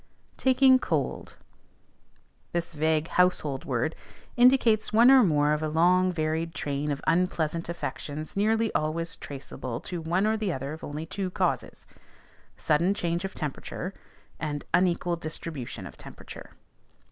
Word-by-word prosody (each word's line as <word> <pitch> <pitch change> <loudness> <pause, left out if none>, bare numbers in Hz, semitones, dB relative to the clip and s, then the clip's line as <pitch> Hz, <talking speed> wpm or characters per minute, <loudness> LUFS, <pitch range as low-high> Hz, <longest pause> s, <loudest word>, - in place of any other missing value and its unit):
"TAKING 260 0 +5
COLD." - - -2 1.2
This 170 0 -2
vague 155 +1 +1
"household 160 -7 +1
word" 135 +4 -1 0.4
indicates 245 -3 +4
one 235 +4 +7
or 265 -1 +8
more 150 -7 +3
of 150 - -1
a 155 - -1
long 180 +4 +3
varied 160 0 -2
train 145 0 -2
of 140 -1 -3
unpleasant 165 -1 0
affections 155 -3 -5
nearly 220 +2 +1
always 165 +2 -1
traceable 130 -3 -7
to 175 -2 -5
one 175 +5 +1
or 220 +1 +2
the 215 -3 -1
other 135 0 -4
of 160 - -10
only 150 +2 -5
two 190 +3 -3
causes, - - -2 0.7
sudden 170 +6 +2
change 170 -1 -1
of 195 - -6
temperature, 155 +5 -5 0.5
and 145 -2 -4
unequal 175 -1 +2
distribution 155 -4 -6
of - - -10
temperature. - - -11
165 Hz, 135 wpm, -27 LUFS, 150-185 Hz, 1.2 s, or